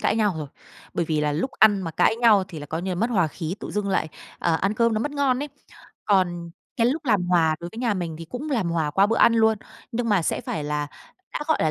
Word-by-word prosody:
cãi 215 - +1
nhau 210 -4 +2
rồi. 150 -2 -5 0.5
Bởi 170 - 0
vì 155 -1 0
là 150 -1 +1
lúc 170 - -1
ăn 205 -3 +5
mà 165 - -3
cãi 160 - +3
nhau 225 -5 +5
thì 165 - -8
là 145 - -8
coi 160 +3 -4
như 190 - -3
là - - -1
mất 225 +7 0
hòa 190 -8 +3
khí, 160 +2 -5
tự - - -6
dưng 205 -1 -2
lại, 190 -4 0 0.3
à, 170 - +1
ăn 195 +5 0
cơm 230 0 +2
nó 215 - 0
mất 290 - -2
ngon 275 -3 +1
ấy. 295 - -4 0.6
Còn 175 -4 +1 0.3
cái 230 - +3
lúc 295 +6 -1
làm 210 -8 +2
hòa 165 -3 +3
đối 170 - -5
với 225 - -9
nhà 235 -3 +1
mình 170 -4 -4
thì 165 - -7
cũng 250 - -6
làm 225 -10 0
hòa 160 -3 0
qua 195 +6 +4
bữa 225 +2 0
ăn 230 - +5
luôn. 220 -1 +3 0.3
Nhưng 230 0 -1
mà 205 -5 +3
sẽ - - -1
phải 155 - -4
là 150 0 -2 0.5
đã - - -3
gọi 315 - +3
là 155 - +2
195 Hz, 275 wpm, -24 LUFS, 165-230 Hz, 0.6 s, ăn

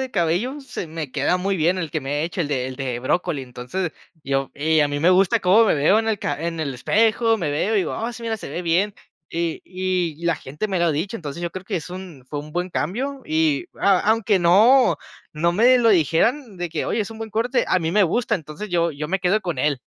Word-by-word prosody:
de 260 -1 -3
cabello, 200 - 0
se 270 -9 -6
me 155 -3 -6
queda 145 +6 +1
muy 195 +1 -1
bien, 175 +3 +2
el 165 -4 -3
que 155 0 -3
me 145 +2 -2
he - - 0
hecho, 175 +1 -2
el 150 - -4
de 130 -3 -1
el 130 0 -7
de 130 -3 -3
brócoli. 165 +3 0
Entonces, 130 +8 -4 0.3
yo 135 0 -1
y 155 +2 +2
a 145 - +3
mí 145 0 -3
me 170 - +4
gusta 185 0 +4
cómo 195 +5 +5
me 215 - +3
veo 155 +9 +4
en 225 0 -1
el 215 -2 0
ca - - -2
en 165 -1 -3
el 140 -4 -3
espejo. 225 - +2
Me 165 -6 -1
veo 190 +10 0
y - - +4
digo: 180 - -1
"Ah, 235 +2 -3
sí, 235 +1 -10
mira, 225 -1 -2
se 200 - -8
ve 170 - -3
bien". 180 +4 +1 0.4
Y 165 -1 -2
y 180 -3 -2
la 170 - +3
gente 150 +11 -5
me 190 - -1
lo 170 - +2
ha 165 - +2
dicho. 185 +10 -2
Entonces, 165 -2 -7
yo 170 - -2
creo 185 +1 -8
que 195 0 -2
es 165 - -5
un 180 -8 -9
fue 145 - -4
un 150 +1 -11
buen 180 +2 -2
cambio, 260 - -3
y 155 -2 +1 0.2
a 195 -2 +4
aunque 220 -3 +2
no 215 +10 +5 0.3
no 170 +3 +1
me 245 +7 +5
lo 235 -2 +4
dijeran, 205 - +2
de 175 -1 -2
que: - - -3
"Oye, - - -1
es 205 0 -3
un 225 - -9
buen 220 -1 -6
corte". 235 +4 +1
A - - +2
mí 165 -2 -2
me 210 +2 +4
gusta, 220 +5 +1
entonces, 165 +4 -6
yo 170 -1 +1
yo 150 +1 -5
me 195 0 -1
quedo 195 +4 +2
con 175 -9 -4
él. 145 -1 +1
175 Hz, 260 wpm, -22 LUFS, 155-210 Hz, 0.4 s, cómo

